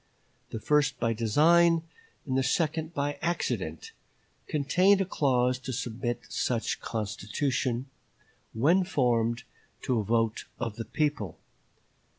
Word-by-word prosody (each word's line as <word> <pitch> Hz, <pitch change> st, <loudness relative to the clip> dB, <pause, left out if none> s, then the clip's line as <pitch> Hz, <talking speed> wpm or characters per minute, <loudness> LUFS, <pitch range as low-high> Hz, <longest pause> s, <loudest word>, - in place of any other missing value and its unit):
The 115 Hz, -, -5 dB
first 145 Hz, +1 st, +2 dB
by 115 Hz, -1 st, +1 dB
design, 160 Hz, +9 st, +4 dB, 0.4 s
and 130 Hz, -3 st, -2 dB
the 135 Hz, -, +3 dB
second 155 Hz, +4 st, 0 dB
by 145 Hz, -2 st, -2 dB
accident, 175 Hz, -, -2 dB, 0.6 s
contained 180 Hz, +7 st, +3 dB
a 195 Hz, -, +1 dB
clause 130 Hz, -6 st, +1 dB
to 130 Hz, 0 st, -5 dB
submit 120 Hz, -1 st, -3 dB
such 115 Hz, -2 st, -1 dB
constitution, 115 Hz, +4 st, -2 dB, 0.7 s
when 160 Hz, +12 st, +3 dB
formed, 120 Hz, -8 st, +1 dB, 0.4 s
to 125 Hz, -3 st, +1 dB
a -, -, -1 dB
vote 115 Hz, +1 st, 0 dB
of 115 Hz, -3 st, -4 dB
the 115 Hz, -, -4 dB
people. 145 Hz, -, -1 dB
130 Hz, 120 wpm, -28 LUFS, 115-155 Hz, 0.7 s, design